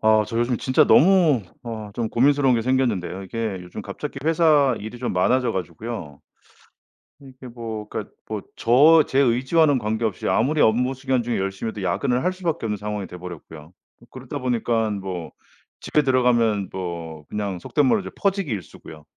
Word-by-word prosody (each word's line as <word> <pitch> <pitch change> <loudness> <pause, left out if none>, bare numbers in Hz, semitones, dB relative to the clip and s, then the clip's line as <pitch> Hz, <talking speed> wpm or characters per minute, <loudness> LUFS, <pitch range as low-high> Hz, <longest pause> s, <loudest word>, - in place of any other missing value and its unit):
아, 110 0 +4
저 115 +3 -4
요즘 120 +1 +1
진짜 130 - +3
너무 165 - +5 0.2
어 110 -3 -6
좀 115 -2 -2
고민스러운 135 +2 +3
게 115 - 0
생겼는데요. 115 -8 0
이게 110 0 -4
요즘 90 +4 -8
갑자기 135 +9 -6
회사 155 -5 +4
일이 110 +4 -8
좀 125 - -3
많아져 125 +8 +2
가지고요 90 -3 -6 1.0
이게 130 -2 -13
뭐 115 -3 -7
그러니까 - - -6 0.2
뭐 - - -4
저 150 +7 +6
제 135 - -1
의지와는 135 +3 +3
관계없이 110 -1 -2
아무리 145 +7 +1
업무 125 +4 +3
시간 130 -1 -1
중에 120 0 -2
열심히 95 +3 -3
해도 105 -2 -7
야근을 125 +8 0
할 180 - +2
수밖에 170 -8 -3
없는 105 -1 -2
상황이 105 -1 -4
돼버렸고요. 85 -3 -9 0.4
어 - - -15
그러다 130 +2 -7
보니깐 115 -4 -1
뭐 90 -3 -6 0.5
집에 150 - +1
들어가면 120 -7 +2
뭐 85 -4 -6
그냥 100 -3 -3
속된 145 - 0
말로 210 - +3
이제 - - -7
퍼지기 195 -5 0
일쑤고요. 85 -6 -8
115 Hz, 370 characters per minute, -23 LUFS, 100-130 Hz, 1.0 s, 저